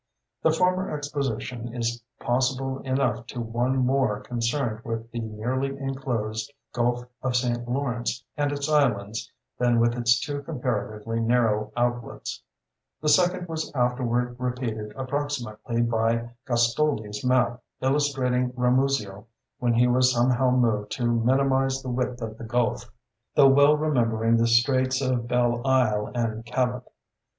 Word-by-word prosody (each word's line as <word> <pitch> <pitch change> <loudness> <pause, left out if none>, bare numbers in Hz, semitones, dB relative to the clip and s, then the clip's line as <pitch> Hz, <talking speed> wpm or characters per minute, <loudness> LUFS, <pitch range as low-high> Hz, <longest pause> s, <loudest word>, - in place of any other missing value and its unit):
The - - +4
former 185 +3 +1
exposition 135 -5 -4
is 120 0 -2 0.2
possible 130 +2 0
enough 130 -3 -1
to 125 - -6
one 120 +3 0
more 130 -4 +2
concerned 120 -1 -2
with 115 -2 -5
the 120 - -4
nearly 125 +5 -2
enclosed 125 -4 -3 0.2
Gulf 120 0 0 0.2
of 130 -2 -1
St. 120 -1 0
Lawrence 125 -2 -2
and 145 -1 0
its 145 0 -2
islands 115 -8 +1 0.3
than 120 -1 +3
with 115 0 +3
its 120 0 +3
two 145 0 -4
comparatively 115 -6 -3
narrow 115 -2 +1
outlets; 120 -1 -2 0.6
the 150 - 0
second 180 +2 +3
was 160 -1 -4
afterward 125 -1 0
repeated 125 -4 -3
approximately 130 -4 -2
by 115 0 0 0.2
Gastoldi's 120 -3 +1
map 125 -1 +2 0.2
illustrating 130 -3 +1
Ramusio 125 -5 +1 0.3
when 120 -1 +1
he 120 +1 +4
was 125 +1 +4
somehow 125 +1 +3
moved 115 -5 +1
to 125 -4 -2
minimize 135 +3 +2
the 130 - -4
width 125 -1 -2
of 110 -1 -6
the - - -7
Gulf, 120 +1 -1 0.5
though 140 -2 +7
well 145 +2 +6
remembering 115 -6 +2
the 115 0 +3
straits 130 +2 +3
of 130 -3 0
Belle 120 -1 +1
Isle 120 -6 +2
and 115 -2 -1
Cabot. 125 +1 -2
125 Hz, 135 wpm, -25 LUFS, 115-135 Hz, 0.6 s, though